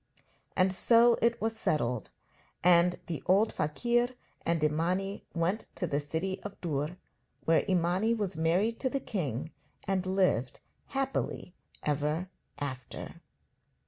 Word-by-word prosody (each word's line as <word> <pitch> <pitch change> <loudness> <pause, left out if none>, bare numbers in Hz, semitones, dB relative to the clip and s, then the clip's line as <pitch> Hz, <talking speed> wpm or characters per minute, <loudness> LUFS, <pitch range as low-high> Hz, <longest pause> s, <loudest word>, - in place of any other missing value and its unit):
And 185 0 +3
so 235 +4 +5
it 235 0 +3
was 225 +1 -1
settled, 125 - 0 0.5
and 175 0 +5
the 165 -4 -4
old 200 +4 +4
fakir 240 +11 +1 0.4
and 165 -2 +1
Imani 180 +6 0
went 175 +6 0
to 180 - 0
the 145 -4 0
city 160 +6 -3
of 205 -1 -8
Dûr, 155 +1 -2 0.5
where 165 0 +4
Imani 185 +5 +2
was 205 -6 -2
married 180 +8 +1
to 260 - +1
the 275 - -1
king 155 - -3 0.4
and 190 -1 0
lived 185 -10 +1 0.3
happily 270 -9 -2 0.3
ever 150 +4 0 0.3
after. 130 -4 -6
180 Hz, 125 wpm, -30 LUFS, 155-205 Hz, 0.5 s, so